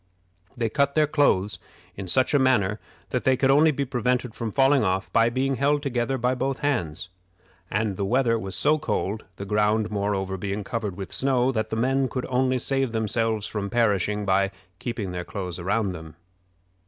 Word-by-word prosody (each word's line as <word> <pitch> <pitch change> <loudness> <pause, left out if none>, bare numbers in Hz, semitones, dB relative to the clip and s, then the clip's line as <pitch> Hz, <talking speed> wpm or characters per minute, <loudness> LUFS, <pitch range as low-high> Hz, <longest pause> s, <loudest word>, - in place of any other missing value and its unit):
They 115 -1 0
cut 140 +4 +1
their 155 -1 +5
clothes 140 -10 +1 0.4
in 95 -1 -6
such 130 +12 +2
a 145 - +5
manner 110 -6 +2 0.3
that - - -1
they 130 -1 +3
could 135 +1 +3
only 150 +3 +5
be 140 -2 -1
prevented 125 -1 -1
from 115 -2 -4
falling 135 +2 +4
off 95 -3 -1
by 115 0 +4
being 130 +2 0
held 145 +1 +1
together 130 -1 -1
by 125 +1 +1
both 135 +1 -2
hands; 90 - -1 0.6
and 105 -2 -1
the 100 - -1
weather 115 +2 +2
was 95 -2 -4
so 155 +1 +3
cold 105 -5 -2
the 100 - -6
ground, 105 +1 +1
moreover, 100 -2 -1
being 100 +2 -3
covered 105 -3 -4
with 95 -2 -6
snow 130 -1 +2
that 110 -3 -2
the - - -2
men 130 +3 +1
could 125 - -3
only 130 0 +2
save 135 -1 -1
themselves 110 -1 0
from 100 -2 -3
perishing 105 -3 +1
by 95 0 +2 0.3
keeping 110 -6 -4
their 90 0 -4
clothes 90 -2 -5
around 100 +3 0
them. 80 -2 -9
115 Hz, 185 wpm, -25 LUFS, 100-130 Hz, 0.6 s, their